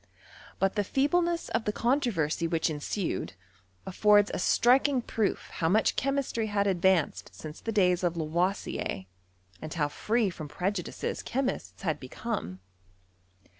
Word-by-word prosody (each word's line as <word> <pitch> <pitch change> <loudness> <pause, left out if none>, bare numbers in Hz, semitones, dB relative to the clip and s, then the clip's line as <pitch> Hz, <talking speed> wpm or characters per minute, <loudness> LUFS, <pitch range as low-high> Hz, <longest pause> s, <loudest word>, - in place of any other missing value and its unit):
But 195 0 +1
the 210 - +1
• - - -2
feebleness 335 - +1
of 225 - -1
the 210 - +1
controversy 210 - 0
which 165 -1 0
ensued, 160 +5 -3 0.5
afibrde 205 +2 +5
■ - - -10
a - - -2
striking 255 +7 +4
proof 220 -3 -1
how 160 - 0
much 215 +5 +3
chemistry 270 -4 0
had 205 -1 +1
advanced 185 -4 +1
since 155 0 -9
the 225 - -3
days 180 -4 +3
of 175 -1 0
Lavoisier, 165 - -1 0.6
and 155 - -6
how 145 -3 +1
free 220 +5 0
from 155 -3 -7
pre 180 +6 -1
■ - - -3
judices 180 -4 -4
chemists 260 -4 -3
had 160 -5 -1
become. 130 - -5
195 Hz, 150 wpm, -29 LUFS, 165-230 Hz, 0.6 s, afibrde